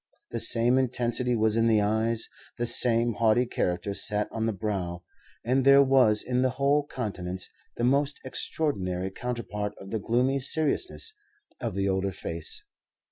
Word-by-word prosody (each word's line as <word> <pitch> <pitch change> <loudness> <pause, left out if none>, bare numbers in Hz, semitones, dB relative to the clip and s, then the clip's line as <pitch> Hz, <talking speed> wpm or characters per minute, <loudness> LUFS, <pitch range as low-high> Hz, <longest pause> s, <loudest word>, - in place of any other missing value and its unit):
The - - -2
same 120 +3 +5
intensity 125 -1 0
was 110 -1 +2
in 115 0 +2
the 110 -2 +4
eyes, 110 +2 0 0.3
the 120 - -1
same 120 0 +5
haughty 115 +3 +2
character 100 -3 -2
sat 105 +1 0
on 110 0 -2
the - - +1
brow; 90 -4 -4 0.4
and 130 +3 +2
there 140 +1 +7
was 130 -6 +4
in 125 0 0
the 130 - +2
whole 140 +3 +1
countenance 95 -8 -5 0.3
the 120 - -2
most 140 +3 +1
extraordinary 95 - -2
counterpart 105 -3 -4
of 95 - -11
the 110 - -1
gloomy 125 +6 +1
seriousness 160 - -1 0.5
of 115 -5 -4
the 100 0 0
older 95 0 0
face. 85 -2 -6
115 Hz, 155 wpm, -27 LUFS, 105-130 Hz, 0.5 s, there